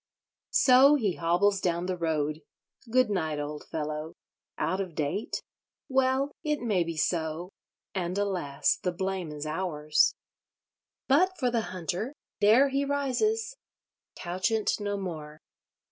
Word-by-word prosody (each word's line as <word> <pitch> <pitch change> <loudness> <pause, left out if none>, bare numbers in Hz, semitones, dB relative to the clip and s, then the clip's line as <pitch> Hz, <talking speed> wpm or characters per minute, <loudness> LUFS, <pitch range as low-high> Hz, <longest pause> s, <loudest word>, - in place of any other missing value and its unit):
So 265 +3 +7
he 210 -10 0
hobbles 190 +4 +2
down 175 0 0
the 185 0 -1
road. 155 -2 -1 0.5
Good 255 -2 +3
night, 160 -6 -1
old 150 0 -5
fellow! 155 +1 -4 0.4
Out 185 +3 0
of 180 -5 -6
date? 155 +7 -2 0.5
Well, 265 +1 +2
it 300 -1 0
may 210 -7 +1
be 165 -1 -5
so. 160 +2 -1 0.4
And 180 -1 -2
alas! 180 -9 0
the 180 - 0
blame 190 -2 -3
is 150 0 -6
ours. 155 -2 +1 0.9
But 365 +8 +3
for 250 -3 +1
the 230 -2 -1
Hunter—there 210 - +1
he 275 +1 0
rises—couchant 280 - -2
no 205 -1 -2
more. 155 -5 -6
185 Hz, 120 wpm, -28 LUFS, 160-250 Hz, 0.9 s, So